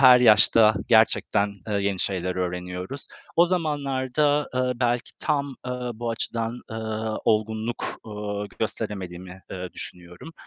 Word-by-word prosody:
her 125 -2 +9
yaşta 110 -1 +7
gerçekten, 105 -2 +3
ııı, 100 -1 0
yeni 100 -1 0
şeyler 90 -1 -1
öğreniyoruz. 90 +6 -4 0.3
O 170 +1 +7
zamanlarda, 145 -3 +1
ııı, 130 0 +1
belki 120 0 0
tam, 140 -3 -1
ııı, 125 -1 -3
bu 115 +1 -3
açıdan, 115 +1 -3
ııı, 110 -1 -3
olgunluk, 110 +2 0
ııı, 105 -1 -4
gösteremediğimi, 95 -4 -4
ııı, 90 -1 -6
düşünüyorum. 90 - -8
110 Hz, 120 wpm, -25 LUFS, 100-125 Hz, 0.3 s, her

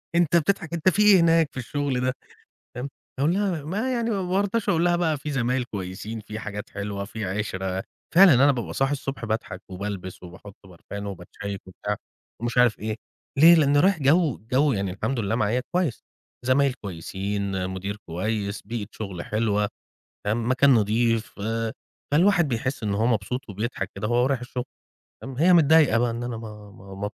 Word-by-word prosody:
أنت 170 -1 +3
بتضحك، 170 0 0
أنت 170 +2 +3
فيه 210 +3 +2
إيه - - +6
هناك 165 -2 +4
في - - -12
الشغل 135 0 -2
ده؟"، 130 0 +1 0.6
تمام، 125 +3 -4 0.3
أقول 150 +5 +3
لها 190 -6 0
ما 205 - -2
يعني 235 -1 0
ما 200 -4 0
بارضاش 200 +4 0
أقول 170 +1 +3
لها 175 0 +3
بقى 165 -3 +1
فيه 150 +2 -5
زمايل 125 -1 0
كويسين، 105 0 -6
فيه 110 0 -7
حاجات 105 -1 -6
حلوة، 100 0 -4
في 110 0 -5
عِشرة. 95 -1 -3 0.3
فعلًا 185 -2 +9
أنا 135 +3 +6
بابقى 120 -4 -4
صاحي 135 +1 +1
الصبح 135 -3 -4
باضحك 110 -4 -3
وبالبس 95 -1 -6
وباحط 90 +3 -11
بارفان 95 +3 -8
وباتشيِّك 100 +1 -6
وبتاع 105 +3 -4 0.5
ومش 120 +1 -2
عارف 125 -3 +4
إيه، 110 0 -3 0.4
ليه؟ 165 +4 +9
لأني 145 -3 +4
رايح 185 +2 +3
جو 150 0 +3
جو 140 +2 +3
يعني 100 -3 -1
الحمد 120 +7 -2
لله 110 0 0
معايا 115 +2 +1
كويس، 175 -8 0 0.4
زمايل 135 +1 +3
كويسين، 95 -1 -3
مدير 95 +2 -4
كويس، 100 +4 -2
بيئة 110 -1 -5
شغل 95 -5 -6
حلوة، 105 -1 0 0.6
تمام، 115 +3 0
مكان 130 +2 +4
نظيف، 115 0 +1
آآ، 115 +2 -2 0.4
فالواحد 175 +2 +4
بيحس 130 +1 -2
إن 105 -2 0
هو 105 +3 +1
مبسوط 120 +2 -1
وبيضحك 100 -1 -3
كده 100 +2 -3
وهو 120 +2 +3
رايح 135 -1 +1
الشغل، 125 0 -4 0.6
تمام. 135 -1 -7
هي 175 +5 +5
متضايقة 160 -6 +6
بقى 120 0 +2
إن 115 +1 -4
أنا 120 -1 -4
ما 105 -2 -10
ما 95 0 -12
ما 100 +1 -3
115 Hz, 180 wpm, -25 LUFS, 100-145 Hz, 0.6 s, فعلًا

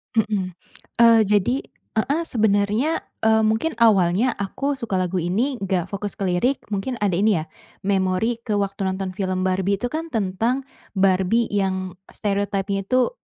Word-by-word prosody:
Mhm, 205 -4 0 0.5
eee, 230 -1 +7
jadi 205 +4 +2 0.4
heeh, 280 +8 +1
sebenernya, 220 +6 +1 0.2
eee, 220 0 +5
mungkin 220 +10 +1
awalnya 200 +1 +4
aku 275 +8 -2
suka 235 -6 -5
lagu 185 +1 -1
ini 210 - 0
nggak 185 -3 -1
fokus 200 0 -4
ke - - -14
lirik 190 +10 +1 0.2
mungkin 230 +5 -2
ada 200 -3 +2
ini 200 -3 +3
ya, 155 - -7 0.4
memori 195 +3 +1
ke 215 - -1
waktu 200 -1 -1
nonton 190 0 -2
film 185 -2 -1
Barbie 190 +1 +1
itu 245 - -1
kan 325 +4 -4
tentang, 225 +6 0 0.3
Barbie 190 +4 +2
yang 190 -2 -1 0.2
stereotype-nya 200 -1 -1
itu, 255 +4 +2
200 Hz, 150 wpm, -22 LUFS, 190-230 Hz, 0.5 s, eee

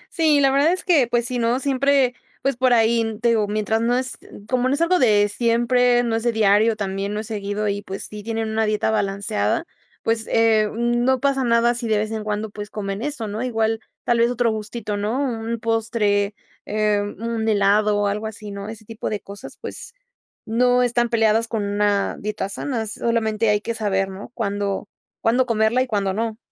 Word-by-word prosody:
Sí, 310 -3 +4
la 270 -1 +4
verdad 285 +5 +3
es 370 - -2
que, 300 -10 +4
pues 240 0 0
sí, 245 0 -1
no 235 +2 +1
siempre, 275 -1 +2 0.3
pues 275 -2 +1
por 255 0 +2
ahí, 225 -1 +2
te 235 - +2
digo, 215 -3 +2
mientras 215 +2 0
no 240 +2 +2
es, 255 -1 -1 0.3
como 255 0 +1
no 280 - +2
es 320 - -3
algo 360 +2 +3
de 210 -4 +4
siempre, 240 +2 +2
no 230 -1 0
es 225 - -1
de 240 0 +1
diario 215 +1 +3
también, 200 0 -3
no 215 - -2
es - - -8
seguido 205 0 -3
y, 200 0 -1
pues 195 0 -6
sí, 210 0 -7
tienen 225 0 -3
una 220 0 +1
dieta 215 +1 0
balanceada, 200 - 0 0.4
pues, 225 -1 0
eh, 220 -2 +3
no 240 +3 +1
pasa 275 -1 +1
nada 235 0 +3
si 235 -1 -3
de 215 -1 +2
vez 215 +1 -2
en 220 -1 -3
cuando, 210 0 -3
pues, 205 0 -7
comen 200 0 -4
eso, 280 -7 -3
¿no? 210 +3 -4
Igual, 225 -3 0 0.2
tal 240 -1 +1
vez 235 +1 +4
otro 240 -2 +1
gustito, 215 -1 -4
¿no? 215 +5 -1
Un 230 -4 -2
postre, 215 -3 0 0.3
eh, 210 -1 +1
un 225 +2 -3
helado 205 0 +3
o 205 - +1
algo 210 +2 -1
así, 210 -1 -7
¿no? 200 +1 -6
Ese 220 -1 -9
tipo 225 0 -5
de 210 - -2
cosas, 200 0 -10
pues, 475 - -5 0.5
no 245 +2 +3
están 240 -1 +1
peleadas 225 0 +2
con 220 -3 -2
una 205 0 0
dieta 210 -1 -3
sana, 230 +1 -2
solamente 220 0 0
hay 210 0 +2
que 230 - -3
saber, 195 -3 0
¿no? 190 +1 -9
Cuándo 200 -2 -2 0.3
cuándo 250 +3 +2
comerla 225 +2 +2
y 255 - 0
cuándo 200 -4 -1
no. 225 +1 -2
225 Hz, 205 wpm, -22 LUFS, 210-240 Hz, 0.5 s, Sí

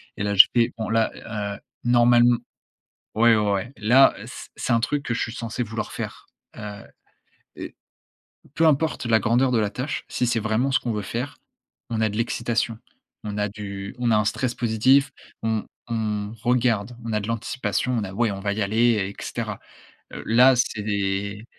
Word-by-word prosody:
Et 100 - -4
là, 100 0 0
je 95 - +11
fais: 115 -1 +3
«Bon 110 - -3
là, 115 0 +2 0.5
heu, - - -19 0.2
normalem» 120 0 +5 0.8
Ouais, 115 0 +5
ouais, 105 -1 +1
ouais, 105 +6 -2
là, 120 +6 +5
c - - -9
c'est 120 - -1
un 115 - +3
truc 145 +4 -1
que 120 - -1
je - - -2
suis 115 - -2
censé 115 +1 -4
vouloir 110 -1 -5
faire. - - -6 0.3
Heu, 105 -1 -7 0.8
et - - -8 0.8
peu 165 - +3
importe 155 -1 +1
la 110 -1 +4
grandeur 125 +3 +2
de 115 - +3
la 105 -2 +1
tâche, 125 +7 -4
si 125 - -1
c'est 115 -1 +1
vraiment 110 +6 0
ce 135 - +2
qu'on 120 - -2
veut 105 -1 -2
faire, 125 +8 -4 0.5
on 110 - -1
a 110 - +2
de 105 - -6
l'excitation, 115 0 -1 0.5
on 105 -1 -4
a 105 0 0
du 100 -1 -7
on 120 -1 +1
a 110 - +4
un 105 - +2
stress 125 +3 -1
positif, 130 +5 +3 0.3
on 110 -1 -1 0.3
on 105 -1 -2
regarde, 120 -2 +1
on 115 - -4
a 105 - +1
de 100 - -5
l'anticipation, 115 +1 -2
on 105 - -1
a 95 - -7
ouais, 115 +1 +1
on 95 - -5
va 100 +1 -1
y 105 0 -1
aller, 115 +4 +3
et 100 -2 -2
cetera. - - -4 0.6
Heu, - - -7
là, 125 +4 +6
c'est, 100 -2 -1
115 Hz, 190 wpm, -24 LUFS, 105-120 Hz, 0.8 s, je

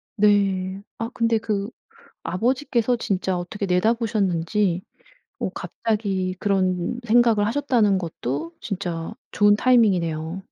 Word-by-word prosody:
네. 195 -2 +2 0.2
아 230 +1 -3
근데 230 -1 +2
그 210 -1 -2 0.5
아버지께서 245 +2 0
진짜 190 -4 -1
어떻게 200 +3 -4
내다보셨는지 195 -2 +1 0.6
어 - - -1
갑자기 195 -4 -2
그런 190 +1 0
생각을 225 -2 +4
하셨다는 235 -6 +2
것도 160 -2 -4
진짜 180 -2 -4 0.2
좋은 205 0 +4
타이밍이네요. 185 -8 +2
200 Hz, 265 characters per minute, -23 LUFS, 185-225 Hz, 0.6 s, 생각을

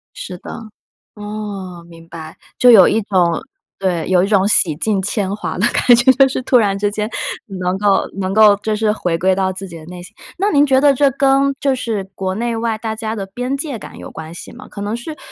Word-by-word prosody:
是 180 - -7
的， - - -10 0.6
哦， 205 -4 -7
明 165 -1 -15
白， 160 -2 -10 0.2
就 250 - +6
有 200 -6 +8
一 220 - +2
种 180 -4 +1 0.4
对， 180 -4 -1
有 180 -1 +3
一 - - +1
种 200 -2 +3
洗 170 -7 +2
尽 200 +4 0
铅 200 0 -2
华 210 - -5
的 200 - +2
感 245 0 +4
觉。 260 +2 +5
就 270 +1 +4
是 260 - -3
突 255 - +2
然 200 -3 +1
之 205 0 0
间 210 +1 -3 0.5
能 180 +1 -1
够 200 -1 +2
能 190 0 -2
够 215 0 +6
就 215 +1 -2
是 215 0 +1
回 175 -5 -2
归 185 +2 +2
到 190 0 0
自 190 +1 -8
己 170 -3 -10
的 155 - -13
内 180 0 -9
心。 195 +5 -14 0.2
那 400 +3 +1
您 290 -2 +5
觉 265 -1 +3
得 285 0 +4
这 275 +1 +3
跟 275 0 +2
就 275 -2 +1
是 225 -6 -3
国 185 0 -3
内 235 0 -2
外 225 -1 -2
大 220 0 -4
家 220 0 -4
的 195 -2 -5
边 250 +7 -4
界 280 -4 -5
感 - - -11
有 - - -9
关 160 0 -9
系 170 - -10
吗？ 255 - -13
可 200 - -9
能 205 +3 -2
是 305 +6 -8
210 Hz, 250 characters per minute, -17 LUFS, 185-240 Hz, 0.6 s, 有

